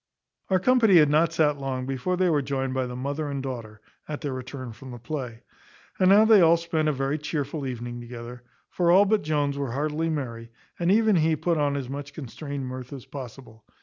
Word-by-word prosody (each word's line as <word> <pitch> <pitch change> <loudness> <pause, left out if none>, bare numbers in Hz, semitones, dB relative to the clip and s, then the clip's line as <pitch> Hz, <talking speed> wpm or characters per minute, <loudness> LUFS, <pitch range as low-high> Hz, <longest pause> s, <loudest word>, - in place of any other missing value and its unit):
Our 190 -1 +3
company 225 -1 +4
had 150 -3 +6
not 160 +2 +3
sat 150 -3 +2
long 130 -2 -3
before 135 +7 -2
they 185 0 +2
were 155 -4 +2
joined 135 -1 -2
by 130 -1 -1
the 125 - -6
mother 145 +4 -3
and 140 -1 -4
daughter, 115 -5 -6 0.3
at 150 -1 -5
their 145 -3 -3
return 130 -1 -7
from 130 +4 -12
the 120 - -7
play. 120 -2 -6 0.6
And 185 - +5
now 205 +3 +7
they 220 -3 +7
all 165 0 +6
spent 165 -2 -1
a - - +3
very 135 +2 -1
chearful 145 -1 -3
evening 120 -1 -5
together; 120 0 -9 0.3
for 175 -1 +1
all 190 +4 +7
but 210 +1 +2
Jones 145 -2 -1
were 135 -4 -3
heartily 155 +4 -1
merry, 120 -7 -4 0.3
and 175 +1 +2
even 215 -2 +4
he 160 0 +3
put 165 +1 0
on 145 -1 +1
as 135 -3 -4
much 140 +2 -6
constrained 140 0 -6
mirth 130 0 -7
as 135 -3 -8
possible. 125 -4 -10
140 Hz, 215 wpm, -26 LUFS, 130-160 Hz, 0.6 s, now